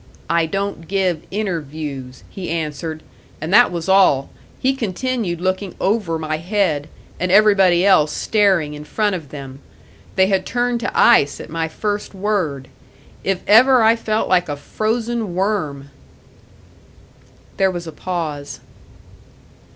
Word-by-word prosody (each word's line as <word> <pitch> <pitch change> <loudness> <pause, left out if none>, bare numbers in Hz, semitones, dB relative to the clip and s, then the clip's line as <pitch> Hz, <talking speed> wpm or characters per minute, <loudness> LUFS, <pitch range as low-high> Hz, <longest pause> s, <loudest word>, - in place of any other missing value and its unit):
'I 170 -1 +2
don't 195 -2 -4
give 185 -5 0
interviews,' 150 -9 -5
he 190 -2 -7
answered; 155 -1 -4 0.4
and 160 +5 -4
that 245 0 +6
was 170 -1 -4
all 190 -8 +4 0.3
he 265 +1 +2
continued 225 -5 -2
looking 185 +1 -2
over 190 -5 0
my 155 -1 -3
head, 165 -4 -1 0.3
and 180 0 -1
everybody 195 -3 +5
else 155 -6 +4
staring 190 -9 +1
in 150 0 -8
front 205 +5 -1
of 155 -6 -8
them. 135 -2 -9 0.6
They 190 - +5
had 190 -1 +1
turned 245 +2 -1
to 235 - -2
ice 145 -12 +5
at - - -9
my 165 0 -1
first 205 +4 -4
word. 185 -10 -2 0.6
If 195 -1 -1
ever 245 +3 +6
I 225 +1 +5
felt 220 -1 -1
like 180 -3 +2
a 145 - -3
frozen 225 +3 -2
worm!" 155 -9 -2 1.7
There 190 0 +3
was 175 -2 -5
a 160 - -7
pause. 155 -5 -5
185 Hz, 135 wpm, -19 LUFS, 155-210 Hz, 1.7 s, that